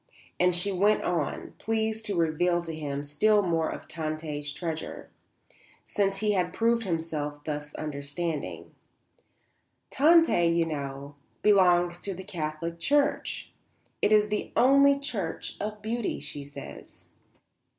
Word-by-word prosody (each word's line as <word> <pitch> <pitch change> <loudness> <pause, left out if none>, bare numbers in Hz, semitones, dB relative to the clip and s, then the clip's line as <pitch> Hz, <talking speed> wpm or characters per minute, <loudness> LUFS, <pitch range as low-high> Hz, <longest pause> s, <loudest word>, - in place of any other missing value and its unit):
And 180 -1 +4
she 180 +3 +1
went 205 +3 +3
on, 165 -5 -2
pleased 220 0 -1
to 200 -4 -1
reveal 170 +2 +2
to 165 -1 -6
him 145 -2 -4
still 205 +9 +3
more 165 -3 +1
of - - -7
Tante's 155 -2 -4
treasure, 160 0 -5 0.7
since 195 -1 0
he 215 -1 +2
had 180 -3 0
proved 230 +2 +2
himself 155 -4 -3
thus 150 -1 -5
understanding; 145 - -4 1.2
"Tante, 320 - +5
you 170 0 +2
know, 140 -2 -5 0.3
belongs 175 -4 +4
to 195 +1 -3
the 190 - -8
Catholic 170 -2 -4
Church; 290 - +1 0.5
it - - +3
is 210 -1 +5
the 210 0 -2
only 275 +3 +6
church 225 - -4
of 210 0 -5
beauty, 230 +1 -2
she 145 -1 -6
says. 70 - -11
175 Hz, 130 wpm, -28 LUFS, 155-210 Hz, 1.2 s, only